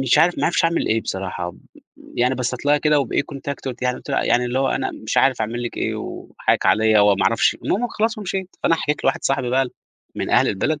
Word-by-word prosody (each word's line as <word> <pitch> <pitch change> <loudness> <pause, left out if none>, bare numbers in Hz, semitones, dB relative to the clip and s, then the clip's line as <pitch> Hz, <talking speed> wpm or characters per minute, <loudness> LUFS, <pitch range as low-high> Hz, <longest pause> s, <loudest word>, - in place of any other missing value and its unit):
مش 135 +3 +3
عارف 175 +3 +3
ما - - 0
عرفتش 170 - +1
أعمل 165 0 +1
إيه 110 +1 +2
بصراحة، 95 -3 -4 0.6
يعني 125 +2 +2
بصيت 125 +2 -3
لها 145 0 +4
كده 150 0 +3
وبإيه 140 - 0
contact 140 0 -7
قُلت 125 -1 -5
لها 125 - +1
يعني 125 - 0
قُلت - - -10
لها - - +1
يعني 125 - +2
اللي 125 +1 -1
هو 135 0 +1
أنا 135 - -1
مش 110 - -5
عارف 135 -3 +3
أعمل 115 +2 -2
لك 120 - -5
إيه، - - -1
وحقِّك - - -2
عليَّ 110 0 +4
وما 100 -1 +4
أعرفش 115 +4 +3
المهم 245 +4 0
خلاص 220 0 -1
ومشيت، 190 -2 -4
فأنا 165 - +4
حكيت 150 -2 -2
لواحد - - +1
صاحبي 130 -2 0
بقى 130 0 +2 0.5
من - - -3
أهل - - +4
البلد. 145 +10 -1
130 Hz, 235 wpm, -21 LUFS, 115-150 Hz, 0.6 s, لها